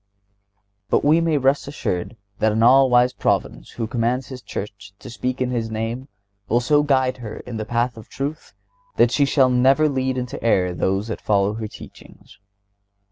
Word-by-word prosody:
But - - +2
we 155 +3 +4
may 165 -2 +1
rest 135 +1 +1
assured 115 -6 -4 0.2
that 110 - +2
an 110 +1 +1
all 130 +2 +6
wise 125 +1 +4
Providence - - -1
who 115 - -3
commands 120 +2 -1
His 130 -2 -8
Church 100 -3 -8
to 125 - -11
speak 125 +2 -3
in 125 -1 -1
His 115 -2 -2
name 115 +4 -4 0.4
will 120 - +3
so 145 +4 +3
guide 130 -3 +1
her 115 -4 -8
in 120 -2 -7
the 110 - -4
path 120 0 0
of 110 - -12
truth 145 +4 -6 0.4
that - - +4
she 145 - +3
shall 135 -2 +3
never 135 +5 +4
lead 130 -2 -1
into 125 0 -5
error 90 -6 +2
those 95 +5 -1
that 110 - -5
follow 100 -1 +1
her 110 0 -5
teachings. - - -15
125 Hz, 185 wpm, -21 LUFS, 110-135 Hz, 0.4 s, all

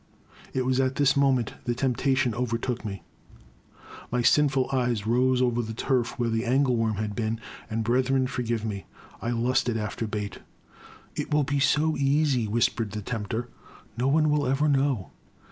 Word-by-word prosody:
It 130 -1 -1
was 130 0 +1
at 130 0 +1
this 140 -1 +3
moment 135 -4 +2
that 120 -1 -1
temptation 130 -1 +1
overtook 120 0 -2
me; 100 -3 -6 1.1
my 120 0 +1
sinful 135 -1 +3
eyes 120 -5 0
roved 125 +2 +3
over 120 -1 +1
the 110 -1 -6
turf 125 +1 0
where 120 -2 0
the 115 0 0
angle 130 +1 +2
worm 115 -2 0
had 105 0 -3
been, 110 -1 -1 0.3
and, 110 0 -1
brethren, 130 +3 +2
forgive 120 -4 -2
me! 100 -3 -5 0.2
— - - -22
I 115 - -2
lusted 120 0 +1
after 110 +1 -3
bait!! 105 -3 -4 0.8
It - - -4
will 150 0 +3
be 140 +1 0
so 150 +3 +2
easy,*' 140 -4 +2
whispered 110 -1 0
the 105 -1 -4
tempter, 115 +2 -3 0.2
" - - -24
no 125 - +2
one 155 +2 +3
will 145 -2 +1
ever 135 +3 +2
know 135 -7 +1
125 Hz, 175 wpm, -26 LUFS, 115-135 Hz, 1.1 s, this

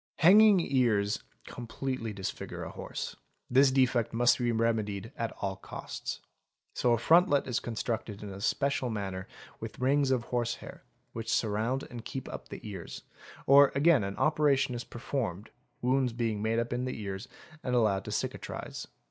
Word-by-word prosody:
Hanging 200 +5 +7
ears 115 -10 +1 0.2
completely 120 -1 -4
disfigure 95 -2 -5
a - - -6
horse, - - -6 0.4
this 135 +2 +6
defect 130 -3 +2
must 120 +2 +4
be 120 -1 +1
remedi 110 -3 0
ed 110 - -12
at 115 -1 -2
all 95 -1 -1
costs: - - -6 0.5
so 120 - +2
a - - +3
frontlet 145 +3 +4
is 125 -2 -1
constructed 110 -3 -4
in 105 - -6
a 95 0 -8
special 140 +2 0
manner 95 -4 -4 0.3
with - - -7
rings 135 +2 +2
of 130 -3 +1
horse 120 -1 -1
hair, - - -11 0.3
which 115 0 -5
surround 115 +5 0
and 120 -2 -8
keep 130 +2 -6
up - - -7
the - - -8
ears: - - -7 0.4
or 140 0 +7
again 145 -4 +5
an 100 0 -4
operation 150 -4 +2
is 120 0 -4
performed, 115 -5 -4 0.3
wounds 130 -1 +2
being 115 -3 -1
made 110 +1 0 0.2
in 125 +1 -1
the 130 - -4
ears 100 -1 -5 0.4
and 125 -1 0
allowed 105 -5 +2
to - - -6
cicatrise. - - -4
120 Hz, 165 wpm, -30 LUFS, 110-135 Hz, 0.5 s, Hanging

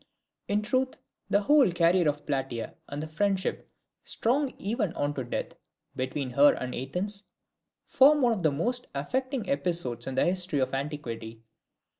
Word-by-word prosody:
In 210 +1 +1
truth, 255 +4 0 0.3
the 200 - +3
whole 280 -1 +5
career 170 0 +3
of 145 0 -4
Plataea, 135 -5 -3 0.2
and 145 +2 -4
the - - -5
friendship, 190 +4 -1 0.3
strong 265 +4 0
even 210 -3 -1
unto 145 -2 -1
death, 120 - -4 0.4
between 130 +1 -3
her 140 +3 +6
and 125 -1 -4
Athens, 185 +11 -3 0.6
form 285 +1 +5
one 240 -2 +4
of 205 - -3
the 155 -3 +3
most 245 - -1
affecting 255 - -2
episodes 170 - -1
in 135 - -3
the 130 - +3
history 180 -3 +1
of 130 -1 0
antiquity. 115 -6 -5
170 Hz, 150 wpm, -28 LUFS, 140-215 Hz, 0.6 s, her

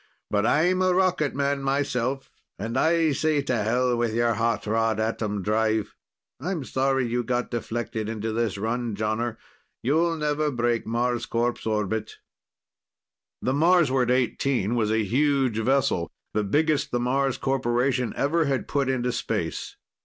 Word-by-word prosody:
"But 105 +1 +2
I'm 180 +7 +3
a 185 -1 +3
rocket 180 -7 +1
man, 140 0 0
myself, 135 -1 -1 0.3
and 115 +4 -4
I 165 -1 +3
say 150 0 +1
to 130 - 0
hell 120 +3 +1
with 120 -2 -1
your 120 0 +2
hot 115 +2 0
rod 110 0 +1
atom 110 -2 -2
drive. 110 +1 0 0.5
I'm 165 +1 -3
sorry 135 0 0
you 120 +1 -1
got 125 0 -2
deflected 115 -2 -3
into 110 0 -3
this 115 -3 -1
run, 115 +1 -2
Jonner; 110 +2 -2 0.5
you'll 165 +6 +2
never 150 0 0
break 120 -3 0
Marscorp's 120 0 -1
orbit." 110 0 -1 1.3
The 130 - +1
Marsward 145 -5 +3
XVIII 125 -3 +1
was 115 -2 +1
a 110 0 +2
huge 130 0 +1
vessel, 120 - +1 0.2
the 105 - +1
biggest 150 +8 +1
the 120 - -1
Mars 135 +2 0
Corporation 125 -1 0
ever 160 +3 +2
had 135 -2 -1
put 140 -2 0
into 125 -1 0
space. - - -3
125 Hz, 145 wpm, -25 LUFS, 115-140 Hz, 1.3 s, I'm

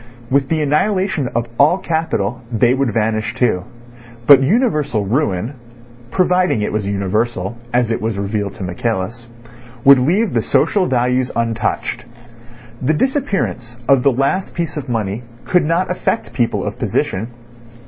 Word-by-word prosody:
With 135 0 +2
the 160 -2 +1
annihilation 185 0 +1
of 120 0 0
all 150 +6 +5
capital 160 - -2
they 120 +2 +3
would 135 -3 0
vanish 110 0 -1
too; 100 -7 +1 0.6
but 140 0 +8
universal 150 - +1
ruin 110 -1 0 0.6
(providing 180 - +2
it - - -1
was 105 -2 -1
universal, 100 +1 -1 0.2
as 120 -1 +1
it 115 - -1
was 110 -2 -2
revealed 100 0 -2
to 105 - -8
Michaelis) 110 +5 -3 0.5
would 140 -1 +8
leave 185 - +1
the - - +2
social 195 -3 +2
values 125 0 +1
untouched. 115 -1 -2 0.8
The 150 +4 +1
disappearance 195 - -1
of 135 -2 +5
the 140 - +4
last 140 +9 -1
piece 165 -4 -3
of 145 -4 -5
money 110 -2 -2 0.2
could 180 -3 +2
not 170 +4 0
affect 120 -9 -2
people 120 -1 0
of - - -5
position. 95 +5 -1
125 Hz, 145 wpm, -18 LUFS, 110-155 Hz, 0.8 s, but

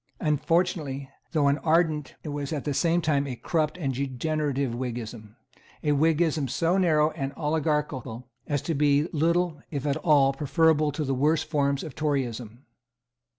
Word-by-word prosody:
Unfortunately, 150 -3 0 0.2
though 150 -4 +2
an 140 +1 +2
ardent, 155 -3 +1
it 155 - -5
was 145 0 -4
at 150 -3 -2
the 145 - -1
same 170 +4 +2
time 145 -2 +1
a 130 - -4
corrupt 155 +5 -1
and 140 -6 -2
degenerate, 140 +2 -2 0.2
Whiggism; 115 -3 -6 0.5
a 150 - +2
Whiggism 155 0 +2
so 170 +9 +1
narrow 155 -4 +3
and 140 -4 -4
oligarchical 150 -6 -2 0.2
as 145 -2 -1
to 165 - -1
be 145 +1 +3
little, 165 0 +1
if 140 -3 -4
at 145 0 +1
all, 145 -4 +4
preferable 155 +1 +2
to 150 +2 -3
the 135 -1 -1
worst 150 +4 +2
forms 140 -2 0
of 155 - -7
Toryism. 125 -5 -3
150 Hz, 155 wpm, -26 LUFS, 135-160 Hz, 0.5 s, all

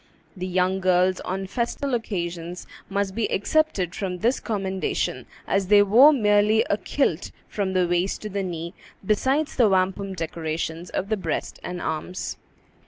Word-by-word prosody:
The 185 -1 -4
young 185 +1 +1
girls 185 0 +3
on 190 +1 -3
festal 245 +6 -2
occasions 175 -6 -3 0.2
must 200 -1 -1
be 225 +1 -1
excepted 200 - +1
from 185 -3 -3
this 235 +7 +1
commendation, 195 -4 -2 0.2
as 195 -1 0
they 205 +1 +7
wore 240 +9 +7
merely 210 -4 +3
a 205 - +2
kilt 195 - 0 0.2
from 195 -2 -2
the 180 -1 +2
waist 175 +4 0
to 215 - -4
the 200 0 -2
knee, 170 -2 -4 0.3
besides 265 +9 +1
the 235 -5 +5
wampum 190 +1 0
decorations 165 0 -4
of 195 - -3
the 215 - +1
breast 190 - -3
and 180 0 -5
arms. 160 +3 -4
190 Hz, 155 wpm, -24 LUFS, 180-210 Hz, 0.3 s, they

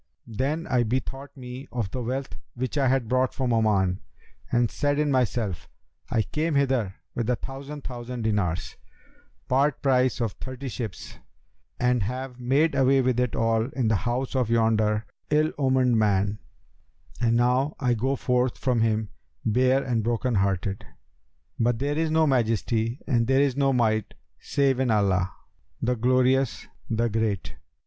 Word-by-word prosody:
Then 135 +9 -2
I 125 -2 +2
bethought 130 +4 -3
me 125 +1 -8
of 115 -6 -3
the 130 - -3
wealth 130 +3 -3 0.2
which 130 +3 -3
I 140 -2 +2
had 130 -2 +1
brought 130 +2 +1
from 130 -3 0
Oman 100 -5 +2 0.5
and 120 -2 +2
said 145 0 0
in 150 -1 +1
myself, 120 -7 -1 0.4
'I 115 -2 +1
came 155 0 0
hither 130 -8 +1 0.2
with 120 -1 -2
a 125 - +3
thousand 140 +3 -8
thousand 120 -1 -6
dinars, 100 -6 -1 0.7
part 135 +2 +2
price 130 -2 +2
of 115 -3 0
thirty 130 +3 -7
ships, 115 -5 -6 0.6
and 125 -1 +2
have 125 +4 -4
made 140 +6 +2
away 135 0 +4
with 125 -1 +1
it 125 -2 0
all 115 0 +2
in 125 -4 0
the 110 - +3
house 125 +5 -2
of 125 -4 +1
yonder 110 -2 +2 0.2
ill 155 +1 +3
omened 130 -4 +3
man, 105 0 +1 0.8
and 115 -1 +3
now 125 +5 +2
I 125 -3 +2
go 130 +4 0
forth 125 -1 0
from 125 -3 +1
him, 110 -1 +1 0.4
bare 130 +4 +3
and 120 -4 0
broken 120 +2 0
hearted! 95 -1 0 0.8
But 120 0 +2
there 140 +4 -1
is 160 -1 +1
no 160 0 +3
Majesty 115 -2 +1
and 120 -5 +2
there 135 +1 +4
is 140 -3 +2
no 140 -1 +2
Might 110 -4 +1 0.2
save 135 -2 +1
in 130 -2 +1
Allah, 95 -4 +2 0.5
the 125 +1 0
Glorious, 130 +2 +2 0.2
the 115 0 +1
Great!' 110 -4 -1
125 Hz, 155 wpm, -26 LUFS, 110-135 Hz, 0.8 s, away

